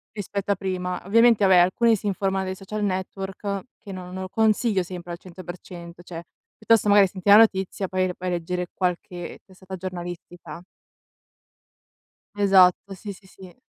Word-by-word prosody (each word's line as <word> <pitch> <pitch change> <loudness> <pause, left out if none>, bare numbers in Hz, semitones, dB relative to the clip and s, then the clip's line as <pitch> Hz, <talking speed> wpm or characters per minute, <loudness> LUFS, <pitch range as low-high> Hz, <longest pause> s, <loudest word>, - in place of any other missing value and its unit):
rispetto 200 -1 -3
a - - +2
prima. 180 -1 -4
Ovviamente 230 +1 +4
vabbè, 190 -2 +6
alcuni 205 +6 +4
si 210 - -5
informano 195 -1 -1
dai 185 0 -4
social 210 +3 -5
network, 195 +1 -3 0.2
che 205 - -11
non 180 -1 -8
non 190 0 -5
lo 185 - -7
consiglio 220 -1 +2
sempre 175 -1 -8
al 170 - -5
100%. 175 -1 -10
Cioè, 170 -1 -8 0.3
piuttosto 220 -1 +3
magari 200 -1 +6
senti 185 +1 -4
la 205 - +10
notizia, 195 -3 +2
poi 185 0 0
vai 185 0 -4
a - - -2
leggere 180 +1 -3
qualche 180 -1 -4
testata 190 0 -10
giornalistica. 175 -1 -8 1.7
Esatto, 195 -1 +4
sì, 200 +2 -8
sì, 195 0 -14
sì. 185 -1 -14
190 Hz, 160 wpm, -24 LUFS, 180-200 Hz, 1.7 s, la